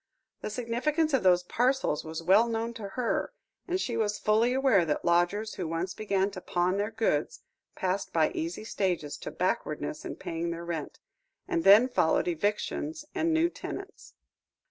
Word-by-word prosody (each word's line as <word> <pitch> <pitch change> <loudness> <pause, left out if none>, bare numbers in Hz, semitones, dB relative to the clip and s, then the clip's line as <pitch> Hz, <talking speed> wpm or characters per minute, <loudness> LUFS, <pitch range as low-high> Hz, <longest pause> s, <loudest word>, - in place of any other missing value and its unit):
The - - -3
significance 255 +8 0
of 270 - +3
those 180 -1 +4
parcels 250 - +1
was 160 +1 -6
well 200 +7 +5
known 230 0 -2
to 220 -4 -6
her, 250 - -1 0.3
and 365 0 0
she 240 -10 -2
was 210 -2 0
fully 220 +4 +2
aware 260 -8 +4
that 150 -3 -2
lodgers 175 +5 +2
who 180 - -4
once 165 +3 -2
began 200 -2 0
to 185 -2 -8
pawn 180 +2 0
their 205 +1 0
goods 220 -9 -1 0.3
passed 190 +1 -2
by 160 -2 +2
easy 165 +5 -4
stages 180 -9 -2
to - - -6
backwardness - - -2
in - - -5
paying 165 +1 -4
their 170 0 -5
rent, 165 -3 -4 0.5
and 345 -3 0
then 210 +6 +8
followed 165 -11 +2
eviction 205 - -1 0.2
and 330 +1 +1
new 320 +1 +3
tenants. 390 +3 -8
205 Hz, 165 wpm, -29 LUFS, 175-245 Hz, 0.5 s, then